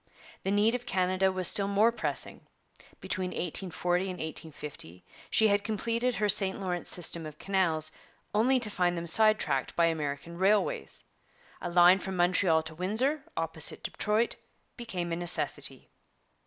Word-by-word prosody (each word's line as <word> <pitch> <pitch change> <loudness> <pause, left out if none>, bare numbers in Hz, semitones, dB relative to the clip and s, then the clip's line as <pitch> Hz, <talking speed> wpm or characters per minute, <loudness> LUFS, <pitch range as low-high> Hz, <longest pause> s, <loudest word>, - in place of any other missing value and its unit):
The - - -3
need 205 +3 +3
of 245 0 -4
Canada 185 0 +1
was 185 -1 +3
still 200 -1 +4
more 205 +3 +3
pressing; 235 - -2 0.6
between 185 -1 -3
1840 180 0 -2
and - - -4
1850 150 - -7 0.2
she 220 - +5
had 205 0 +2
completed 230 +3 -1
her 210 +1 +1
St 195 -1 +2
Lawrence 180 -3 -3
system 170 -2 -1
of 155 -1 -11
canals, 165 -5 0 0.4
only 250 +5 +3
to 215 -3 0
find 175 -2 0
them 170 - -4
side 215 +6 +4
tracked 135 -1 -1
by 170 - +4
American 160 +1 -3
railways. 215 - +1 0.6
A 175 - -3
line 175 +2 +6
from 190 0 -5
Montreal 175 -2 +3
to 160 0 -7
Windsor, 235 - 0
opposite 165 -1 -1
Detroit, 215 +2 -1 0.4
became 185 -8 -4
a - - 0
necessity. 175 0 +1
185 Hz, 150 wpm, -29 LUFS, 170-210 Hz, 0.6 s, line